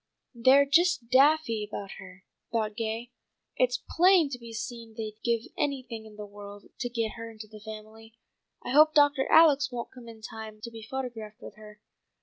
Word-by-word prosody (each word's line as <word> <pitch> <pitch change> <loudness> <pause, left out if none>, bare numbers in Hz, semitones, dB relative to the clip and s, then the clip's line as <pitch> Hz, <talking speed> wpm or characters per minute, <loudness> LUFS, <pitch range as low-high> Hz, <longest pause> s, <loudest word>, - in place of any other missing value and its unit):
"They're 260 +4 +5
just 320 -4 +2
daffy 270 -4 +4
about 205 -1 -7
her," 185 0 -13 0.3
thought 215 -2 -1
Gay. 225 +2 -4 0.4
"It's 250 0 +1
plain 355 -3 +4
to 250 - -5
be 235 -1 -10
seen 230 0 -7
they'd 215 -1 -6
give 235 -1 +1
anything 255 -6 -3
in 215 - -14
the 210 0 -7
world 205 0 -11
to 245 - -2
get 230 -2 -2
her 230 0 -7
into 220 -1 -10
the 215 0 -13
family. 220 +1 -11 0.5
I - - -3
hope 310 +3 +6
Doctor 290 -2 +4
Alex 290 -4 +6
won't 240 -1 -5
come 250 -2 -13
in 225 -1 -12
time 220 -1 -8
to 235 - -7
be 225 -1 -10
photographed 230 -2 -6
with - - -9
her. 210 0 -14
230 Hz, 180 wpm, -28 LUFS, 215-265 Hz, 0.5 s, hope